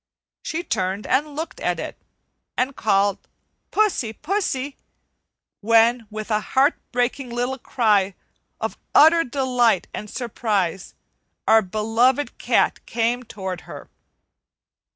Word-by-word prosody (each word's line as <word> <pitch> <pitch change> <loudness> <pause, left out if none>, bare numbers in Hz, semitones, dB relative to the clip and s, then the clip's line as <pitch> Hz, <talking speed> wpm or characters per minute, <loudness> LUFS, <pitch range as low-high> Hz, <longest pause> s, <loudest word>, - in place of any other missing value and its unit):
She 330 +2 -3
turned 190 - -2
and 285 +3 0
looked 320 +2 -5
at - - -1
it, - - -5 0.6
and 260 +2 0
called 200 -1 +2 0.5
"Pussy, 360 - +1
pussy," 290 - -2 0.8
when 230 +1 +3
with 215 +1 -6
a 215 - +3
heart 265 +8 +2 0.2
breaking 250 +1 -1
little 245 +2 -2
cry 205 -6 +2 0.4
of - - -4 0.2
utter 330 +2 +7
delight 250 - +1
and 210 - -6
surprise, 205 -7 -2 0.5
our 220 0 +6
beloved 225 +8 +1
cat - - +1
came 235 +2 0
toward 190 -6 -6
her. - - -10
235 Hz, 110 wpm, -23 LUFS, 210-265 Hz, 0.8 s, utter